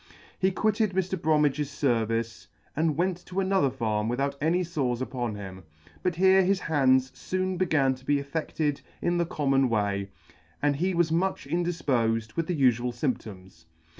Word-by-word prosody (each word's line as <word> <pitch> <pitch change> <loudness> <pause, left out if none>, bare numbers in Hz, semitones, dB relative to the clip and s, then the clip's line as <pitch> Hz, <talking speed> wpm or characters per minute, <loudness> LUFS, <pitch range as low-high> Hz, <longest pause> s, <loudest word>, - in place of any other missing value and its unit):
He 190 - +3
quitted 215 +1 0
Mr. 190 0 0
Bromedge's 150 -4 +1
fervice, 115 -5 -1 0.3
and 155 -1 +1
went 180 0 -1
to 185 +1 -3
another 190 -7 +2
farm 110 -4 -1
without 140 +3 -1
any 170 +4 +2
fores 140 -8 -1
upon 125 -4 -3
him; 95 -2 -8 0.4
but 180 -2 0
here 190 +2 +5
his 190 0 +1
hands 130 -4 +2
foon 185 0 -2
began 155 -7 +2
to 130 0 -13
be 145 +2 +2
affected 145 0 -2 0.2
in 175 0 0
the 170 - +1
common 135 -4 +1
way, 100 -3 -1 0.5
and 145 -1 +1
he 185 +4 0
was 170 -1 +2
much 175 -2 0
indifpofed 130 -10 0
with 165 -1 -1
the 175 -5 -2
ufual 125 -2 +3
fymptoms. 100 - -5
145 Hz, 160 wpm, -27 LUFS, 120-175 Hz, 0.5 s, here